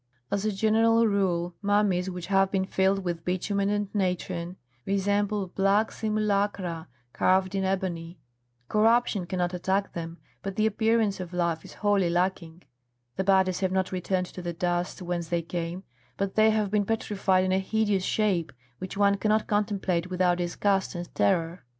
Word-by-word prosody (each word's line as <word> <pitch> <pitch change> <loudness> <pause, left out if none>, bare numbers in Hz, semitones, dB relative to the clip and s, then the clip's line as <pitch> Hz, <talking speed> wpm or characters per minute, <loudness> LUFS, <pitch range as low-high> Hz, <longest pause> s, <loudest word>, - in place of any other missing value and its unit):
As 200 +1 -1
a 215 - +1
general 225 +3 +3
rule 180 -4 0
mummies 200 -3 +2
which 180 -2 -6
have 195 0 +3
been 190 -1 0
filled 190 0 +1
with 170 -2 -3
bitumen 195 +3 -1
and 205 -1 -2
natron 180 -2 -2 0.3
resemble 200 +1 0
black 195 +4 +2
simulacra 200 -5 -1 0.3
carved 185 +1 +2
in 195 -1 0
ebony; 180 -3 -2 0.5
corruption 220 -3 +2
cannot 180 -1 -1
attack 190 +3 -1
them, 165 0 -6 0.2
but 195 -1 -5
the 215 - +2
appearance 220 -1 +1
of 180 -1 -6
life 170 -2 -1
is - - -12
wholly 200 -4 +3
lacking; 175 -1 -1 0.5
the 190 - -1
bodies 190 -1 +3
have 190 -1 0
not 190 0 0
returned 185 0 -1
to 180 - -9
the 175 -1 -4
dust 175 +2 -2
whence 175 -1 -3
they 170 0 -1
came, 170 +2 -4 0.3
but 195 -1 -2
they 220 0 +5
have 215 -2 0
been 210 -1 +2
petrified 200 -3 +1
in 185 - 0
a 190 - +3
hideous 205 -1 0
shape, 185 -8 0 0.3
which 185 +1 -6
one 200 0 +3
cannot 215 +1 +1
contemplate 200 -4 0
without 180 -1 +1
disgust 190 +2 0
and 175 0 -6
terror. 165 - +1
190 Hz, 160 wpm, -27 LUFS, 180-205 Hz, 0.5 s, they